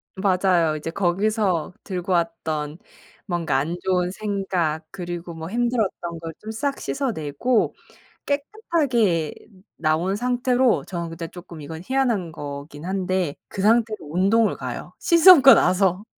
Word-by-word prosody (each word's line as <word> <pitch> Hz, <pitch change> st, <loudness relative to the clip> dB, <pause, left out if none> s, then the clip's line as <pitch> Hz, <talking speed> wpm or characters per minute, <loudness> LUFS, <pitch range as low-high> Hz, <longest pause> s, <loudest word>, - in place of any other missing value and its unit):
맞아요. 185 Hz, -4 st, +2 dB
이제 155 Hz, +2 st, -5 dB
거기서 185 Hz, -1 st, 0 dB
들고 185 Hz, -1 st, -4 dB
왔던 160 Hz, -3 st, -1 dB, 0.5 s
뭔가 170 Hz, -7 st, 0 dB
안 155 Hz, +6 st, -1 dB
좋은 180 Hz, -1 st, +1 dB
생각 190 Hz, -6 st, -2 dB
그리고 175 Hz, -1 st, -6 dB
뭐 160 Hz, 0 st, -7 dB
힘들었던 220 Hz, -7 st, -1 dB
걸 165 Hz, 0 st, -7 dB
좀 220 Hz, -, -7 dB
싹 275 Hz, +5 st, -2 dB
씻어내고 230 Hz, -, -1 dB, 0.5 s
깨끗하게 280 Hz, -, 0 dB, 0.4 s
나온 165 Hz, +4 st, +1 dB
상태로 250 Hz, +1 st, +1 dB
저는 170 Hz, -2 st, -4 dB
근데 165 Hz, 0 st, -6 dB
쪼끔 170 Hz, -1 st, -11 dB
이건 160 Hz, +2 st, -7 dB
희한한 235 Hz, -10 st, 0 dB
거기는 145 Hz, +2 st, -7 dB
한데 185 Hz, -5 st, -1 dB
그 195 Hz, -, -5 dB
상태로 220 Hz, +1 st, +3 dB
운동을 205 Hz, +5 st, +3 dB
가요. -, -, -6 dB
씻으고 335 Hz, -5 st, +8 dB
나서. 185 Hz, +2 st, +2 dB
185 Hz, 270 characters per minute, -23 LUFS, 165-225 Hz, 0.5 s, 씻으고